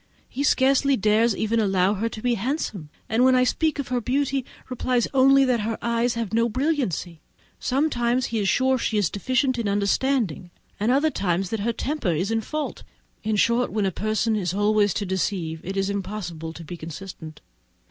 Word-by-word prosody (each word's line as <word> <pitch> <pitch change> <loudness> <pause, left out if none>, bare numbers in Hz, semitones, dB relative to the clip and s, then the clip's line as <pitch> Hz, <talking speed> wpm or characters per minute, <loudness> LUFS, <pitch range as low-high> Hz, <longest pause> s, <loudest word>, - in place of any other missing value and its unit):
He 275 - -5
scarcely 275 -1 +3
dares 215 +1 +2
even 225 +1 0
allow 195 -2 +2
her 220 +3 -1
to 215 - -9
be 245 -1 +2
handsome, 225 - -3 0.2
and 225 +3 +2
when 260 0 +5
I 255 - +4
speak 315 +5 +1
of 280 -3 -4
her 250 -1 0
beauty, 270 +2 0 0.2
replies 250 -1 0
only 270 +1 +5
that 250 -2 +2
her 220 +1 -2
eyes 235 0 0
have 230 -4 -3
no 230 +1 +2
brilliancy! 235 - -1 0.4
Sometimes 255 -3 +1
he 230 - -2
is 200 -2 +1
sure 260 0 +2
she 220 - -1
is 200 -6 +1
deficient 255 +4 0
in 220 -3 -1
understanding, 200 - 0 0.3
and 215 +4 +2
at - - +4
others 190 - 0
that 225 - -1
her 225 +4 0
temper 280 0 -3
only 165 -2 +1
is 200 +4 -2
in 225 0 +1
fault. 305 +6 -4 0.4
In 215 0 0
short, 235 +4 +2
when 210 -2 0
a 190 - +1
person 215 +3 0
is 185 -3 -1
always 205 -1 +2
to 205 - -1
deceive, 180 -3 -2
it 195 +2 -5
is 195 0 +1
impossible 185 -5 -5
to 165 +1 -10
be 175 +2 -8
consistent. 160 -1 -9
220 Hz, 195 wpm, -24 LUFS, 195-255 Hz, 0.4 s, when